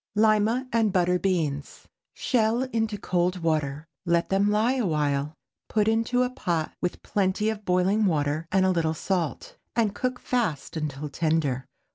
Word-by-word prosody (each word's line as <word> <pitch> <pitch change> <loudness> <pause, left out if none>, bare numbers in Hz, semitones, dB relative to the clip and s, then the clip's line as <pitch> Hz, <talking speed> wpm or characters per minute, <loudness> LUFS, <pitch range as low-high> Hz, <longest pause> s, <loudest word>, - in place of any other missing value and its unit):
LIMA 220 +4 +3
AND 225 -3 +3
BUTTER 180 -1 +2
BEANS. 160 -7 -2 0.3
Shell 235 0 +1
into 220 -2 0
cold 180 -2 -1
water; 150 -2 0 0.2
let 170 -1 +1
them 195 +1 +2
lie 215 +4 +2
a 245 - 0
while; 150 -1 0 0.3
put 215 -1 +1
into 230 +3 +2
a 250 - 0
pot 170 -10 -2
with 180 - -3
plenty 200 +2 0
of 210 -1 -8
boiling 185 +4 +2
water 155 -1 0
and 190 -1 +3
a 190 - +3
little 160 -3 0
salt, 175 -2 -2 0.2
and 220 -4 +2
cook 250 +4 -2
fast 215 - -2
until 150 -2 -3
tender. 150 -5 0
185 Hz, 155 wpm, -26 LUFS, 160-215 Hz, 0.3 s, LIMA